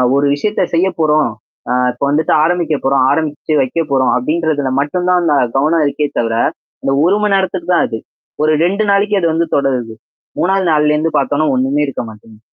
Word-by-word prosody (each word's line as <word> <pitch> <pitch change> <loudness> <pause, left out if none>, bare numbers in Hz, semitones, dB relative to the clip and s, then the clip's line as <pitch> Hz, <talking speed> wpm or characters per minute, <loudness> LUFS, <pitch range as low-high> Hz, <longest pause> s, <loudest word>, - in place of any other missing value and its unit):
ஒரு 140 +1 +2
விஷயத்த 205 +6 -1
செய்ய 180 +3 +2
போறோம். 155 -4 +2 0.4
அ - - +2 0.2
இப்ப 125 - -7
வந்துட்டு 155 +2 +1
ஆரம்பிக்க 170 -1 0
போறோம், 135 -1 +3
ஆரம்பிச்சு 155 +1 -1
வைக்க 130 +5 -3
போறோம். 130 -2 +2
அப்படின்றதுல 150 0 -1
மட்டும் 180 +5 -2
தான் 180 -1 +3
அந்த 155 -4 +2 0.2
கவனம் 155 +3 +2
இருக்கே 145 +1 -2
தவிர, 115 -1 -1 0.5
அந்த - - 0
1 195 +4 +3
மணி 205 -2 +2
நேரத்துக்கு 185 -2 -2
தான் - - +3
அது. 110 - -5 0.4
ஒரு 155 - +3
2 200 +4 0
நாளைக்கு 200 +1 +2
அது 170 - +1
வந்து 165 +1 0
தொடருது. 125 -5 -1 0.5
3வது 190 +1 +1
நாள்லேருந்து 150 +1 +1
பார்த்தோனா 150 +2 0
ஒண்ணுமே 135 +3 0
இருக்க 135 - -4
மாட்டேங்க. 110 0 -15
155 Hz, 175 wpm, -15 LUFS, 135-175 Hz, 0.5 s, போறோம்